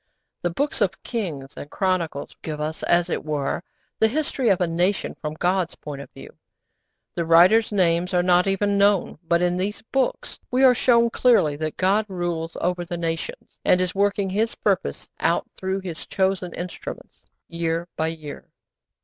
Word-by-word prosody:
The 175 - 0
Books 280 - -2
of 190 -2 0
Kings 160 - -4
and 145 - -8
Chronicles 175 -7 -1
give 155 -1 -5
us, 155 +1 -3
as 175 0 +2
it - - -2
were, 150 -2 -2 0.4
the 220 - +5
history 270 -1 0
of 195 - +3
a 180 - +2
nation 175 +4 0
from 150 0 -4
God's 180 +1 0
point 145 -2 -7
of - - -11
view. - - -13 0.8
The 170 - -1
writers' 180 +8 +5
names 180 -2 +2
are 180 -1 +2
not 180 +1 +4
even 200 +1 +1
known. 200 -5 +2
But 170 +1 +3
in 180 0 +1
these 200 +4 -3
Books 270 -2 -1
we 255 +1 +2
are 255 -1 +8
shown 235 -1 +3
clearly 225 - +3
that 155 0 -4
God 200 +3 +2
rules 170 -3 -3
over 180 0 0
the 175 0 -5
nations, 165 -1 -4
and 180 - +4
is 185 -1 0
working 200 -1 +1
His 220 +4 0
purpose - - -1
out - - +1
through 190 +1 -2
His 175 -4 -7
chosen 190 -2 0
instruments, 175 0 -8 0.2
year 170 0 -2
by 160 - 0
year. 155 -3 -7
180 Hz, 175 wpm, -23 LUFS, 165-200 Hz, 0.8 s, are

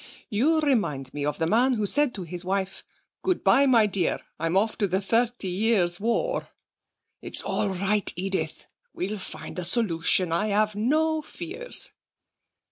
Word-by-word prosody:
You 300 +10 +2
remind 170 - 0
me 145 - -4
of 150 - -2
the 165 - 0
man 240 +9 +3
who 215 -3 -1
said 290 +4 +1
to 190 - -5
his 175 +1 -7
wife: 190 +1 -2 0.4
"Good 370 -1 -1
bye, 265 +9 +5
my 235 -4 +5
dear, 195 -4 0 0.2
I'm 165 +3 0
off 215 +3 +1
to 205 - +2
the 190 +1 0
Thirty 230 +1 0
Years' 185 -2 +1
War." 235 - -1 0.7
It's - - -5
all 205 - 0
right, 200 +2 0
Edith. 190 +2 -2 0.3
We'll 200 +3 -3
find 155 -1 -7
a - - -3
solution, 175 -3 +3
I 170 +6 +1
have 215 +1 +1
no 310 +9 +1
fears.' 390 +11 -1
205 Hz, 160 wpm, -26 LUFS, 180-245 Hz, 0.7 s, bye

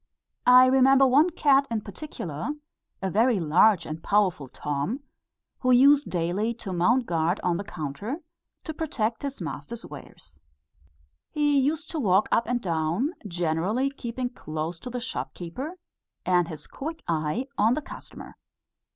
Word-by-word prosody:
I 250 +1 +9
remember 265 +1 +5
one 285 +7 +5
cat 280 -5 +3
in 225 -2 -1
particular, 200 - -6 0.5
a 190 - -1
very 225 +2 +3
large 175 +3 +4
and 155 +1 -6
powerful 190 -9 +1
Tom, 145 - -3 0.6
who 255 - 0
used 280 +3 +6
daily 185 +7 -1
to 205 -5 -6
mount 235 +9 +2
guard 170 +1 0
on 175 -1 +1
the 200 - -4
counter, 195 - -5 0.4
to 315 - -5
protect 235 -8 -2
his 280 -1 -5
master's 160 +7 -6
wares. - - -12 0.9
He 290 -2 +2
used 300 +4 -1
to 320 - -3
walk 200 -5 +3
up 230 - +2
and 245 +1 0
down, 170 - -1 0.2
generally 180 +9 0
keeping 245 -1 -4
close 160 -6 -5
to 250 - -7
the 250 0 -4
shopkeeper, 255 - -6 0.5
and 180 -2 +3
his 160 -3 -8
quick 320 +4 -7
eye 160 +9 -1
on 225 +4 +4
the 305 - -2
customer. - - -11
220 Hz, 145 wpm, -26 LUFS, 170-265 Hz, 0.9 s, I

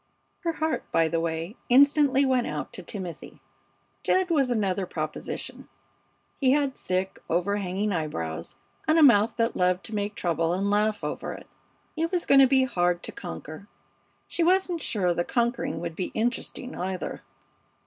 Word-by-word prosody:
Her 335 -1 -1
heart, 315 0 -1
by 165 0 +3
the 165 +1 0
way, 165 +4 -3
instantly 280 +1 +5
went 255 -2 +2
out 150 -2 -4
to - - -7
Timothy. 180 -1 -7 0.6
Jed 370 -1 +1
was 275 -5 +3
another 195 -5 0
proposition. 155 -2 -5 0.7
He 265 -2 +4
had 285 -2 +1
thick, 185 -2 -2
overhanging 195 +3 0
eyebrows, 85 - -4 0.3
and 315 +1 +4
a 320 - +7
mouth 225 -5 +5
that 230 -1 +1
loved 180 0 +2
to 225 - -7
make 205 0 -2
trouble 165 -1 0
and 200 +2 0
laugh 210 +1 +1
over - - -3
it. - - -10 0.5
He 325 +1 0
was 350 0 -1
going 275 0 +7
to 265 - +7
be 265 0 +4
hard 175 -8 0
to - - -6
conquer. 155 - -8 0.6
She - - -2
wasn't 360 -1 +2
sure 185 -9 +1
the 175 - 0
conquering 240 +6 -1
would 170 -2 -4
be 185 - -3
interesting, 245 +3 -2
either. 185 +1 -4
205 Hz, 160 wpm, -26 LUFS, 175-270 Hz, 0.7 s, a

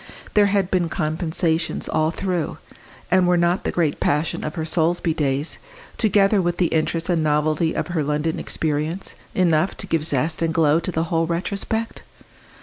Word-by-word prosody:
There 205 -1 +5
had 195 -2 +1
been 175 -3 +1
compensations 160 0 -1
all 155 0 +1
through 175 -2 -2 0.5
and 185 -1 +4
were 180 0 +4
not 175 +2 +1
the - - 0
great 160 -4 0
passion 150 +2 0
of 155 - -4
her 160 -2 -2
Solesby 165 +1 +1
days, 145 -1 -1 0.4
together 205 -2 +3
with 175 -1 -1
the 175 - +2
interest 165 +1 0
and 175 -3 +1
novelty 155 +2 +1
of - - -2
her 170 -3 0
London 150 +2 -1
experience, 155 +4 -2 0.2
enough 175 -1 +2
to - - -4
give 165 -5 0
zest 155 +2 0
and 165 -1 0
glow 155 -1 +4
to 185 - -3
the 160 -1 0
whole 165 0 +2
retrospect? 200 +6 -3
165 Hz, 170 wpm, -22 LUFS, 155-180 Hz, 0.5 s, There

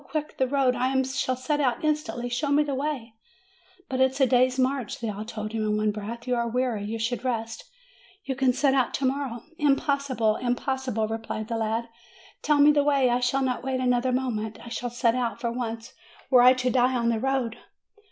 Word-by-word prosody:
quick, 300 +2 -4
the 260 - +3
road! 265 -2 +2
I 260 +2 +1
shall 265 0 -1
set 275 +4 -1
out 255 +2 0
instantly; 270 -6 -1
show 245 +5 -2
me 290 +1 +4
the 290 -1 -3
way 265 -4 -3 0.4
!" 375 0 -32
"But 260 -1 -1
it 260 - +5
is 270 - -8
a - - +7
day's 255 0 +3
march," 260 -3 -1
they 230 - -3
all 205 +1 -6
told 215 -1 -5
him, 225 -1 -2
in 210 0 0
one 215 0 +1
breath. 220 +3 -7
"You 250 - 0
are 235 0 0
weary; 245 -3 -1
you 220 +2 -3
should 230 +2 -2
rest; 225 -3 -3 0.6
you 265 - -3
can 260 -1 +3
set 265 +2 +2
out 260 -3 +1
to 275 - -1
morrow." 260 -3 -2 0.2
"Impossible! 280 -6 +1
impossible!" 250 -2 -1
replied 225 0 -5
the 230 - -1
lad. 225 +1 -1 0.5
Tell 300 -1 +2
me 290 +1 +7
the 290 -1 +3
way; 275 -4 +3
I 245 - +2
shall 250 +2 +1
not 255 -1 -1
wait 260 -1 -1
another 250 0 +1
moment; 225 -4 -2
I - - -8
shall 245 +1 -3
set 235 -1 +1
out 240 -1 -2
at 235 - 0
once, 230 -1 -5 0.4
were 250 -2 +7
I 250 +1 +8
to 255 -1 -1
die 255 +1 +3
on 235 -1 +1
the 230 -1 0
road!" 260 -2 -1
250 Hz, 220 wpm, -26 LUFS, 230-270 Hz, 0.6 s, I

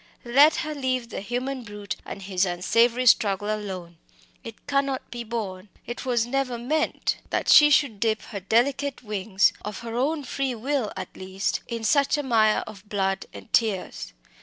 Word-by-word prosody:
let 280 +6 +6
her 305 - -3
leave 255 -4 -2
the - - -5
human 250 +4 -3
brute 205 -2 -6
and 195 - -7
his 185 -1 0
unsavoury 230 +7 +2
struggle 205 -3 +3
alone! 185 -5 -6 0.5
It 225 -2 -10
cannot 275 -2 -1
be 240 -1 -5
borne 210 -4 -5 0.2
it 240 +3 -6
was 240 -2 +2
never 255 -1 -1
meant 305 +7 -1
that - - -1
she 295 0 +8
should 275 -7 +3
dip 220 -1 0
her 200 - -6
delicate 260 +7 0
wings, 205 -2 +1
of 210 +1 -6
her 230 -1 -6
own 290 +5 0
free 265 -1 -2
will 255 -1 -1
at - - -7
least, 190 +1 -2
in 230 -1 -5
such 280 +6 +3
a 295 - -2
mire 220 -4 +3
of 205 -1 -12
blood 195 -1 -1
and - - -12
tears. 190 - 0
230 Hz, 170 wpm, -25 LUFS, 205-265 Hz, 0.5 s, she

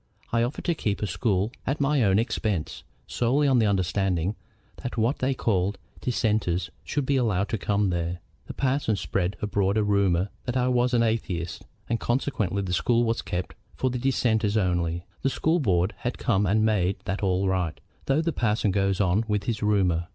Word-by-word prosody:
I 115 - +3
offered 120 +5 -2
to 170 - +2
keep 105 -9 -2
a - - +2
school 100 +2 0 0.2
at 135 +3 0
my 145 0 +2
own 100 -3 +4
expense, 105 -6 -1 0.2
solely 135 +5 +1
on 130 -3 +4
the 110 - +3
understanding 95 -1 0 0.4
that 125 - -6
what 115 +5 +1
they 130 +1 +1
call 100 -4 0 0.2
Dissenters 105 -8 0
should 145 -1 -2
be 140 +1 +2
allowed 105 -5 +1
to 110 - -2
come 100 -1 +1
there. 85 0 -2 0.3
The - - -7
parson 130 -4 +1
spread 95 0 -1
abroad 100 0 +1
a 110 - +3
rumor 100 -2 +2 0.2
that 125 0 -1
I 125 0 +2
was 125 0 +2
an 115 - +4
atheist, 95 -7 -2 0.2
and 115 0 0
consequently 110 -6 -1
the 90 -2 -3
School 120 +6 +2
was 115 -1 0
kept 90 0 -4 0.2
for 130 - 0
the 125 - -2
Dissenters 115 -5 +1
only. 85 -3 0 0.2
The 135 - +2
School 160 +5 +1
board 95 - +1
has 120 - -2
come 105 -3 +1
and 110 +4 +3
made 100 -3 +2
that 95 +3 -2
all 95 -1 +1
right, 90 -4 -1 0.3
though 140 +4 +2
the 165 -1 0
parson 110 -4 +1
goes 100 0 +1
on 100 +2 +2
with 105 -2 0
his 115 -1 -2
rumor. 95 -5 +2
105 Hz, 190 wpm, -26 LUFS, 95-120 Hz, 0.4 s, own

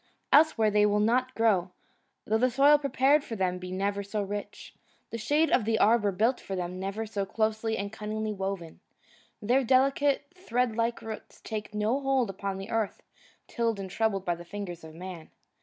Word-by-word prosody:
Elsewhere 285 -8 +5
they 210 0 +4
will 210 0 +3
not 250 +4 +1
grow, 205 -6 +2 0.6
though 220 +1 +1
the 255 +2 +3
soil 280 +4 +5
prepared 275 +1 +3
for 230 - -6
them 185 -2 -1
be 180 0 -7
never 200 +2 -1
so 200 +2 -4
rich, 205 +1 -6 0.4
the 230 - -3
shade 295 +8 +2
of 245 - +4
the 220 +1 +1
arbour 210 -2 +4
built 225 +7 +1
for 195 - -5
them 180 0 -4
never 200 +4 -3
so 210 -2 -3
closely 220 +2 -1
and 200 +2 -4
cunningly 215 0 -3
woven. 190 -4 -5 0.6
Their 250 +6 +3
delicate, 275 +3 +3
thread 250 - -1
like 230 +1 -1
roots 220 -1 -8
take 215 -1 -6
no 215 +6 +1
hold 270 -6 +1
upon 195 0 -4
the 195 +2 -7
earth 225 -3 -2 0.4
tilled 230 -3 -1
and 190 -1 -6
troubled 200 -2 0
by 175 - +1
the 170 0 -8
fingers 175 -2 -7
of 160 0 -11
man. 175 -2 -8
215 Hz, 185 wpm, -28 LUFS, 195-240 Hz, 0.6 s, Elsewhere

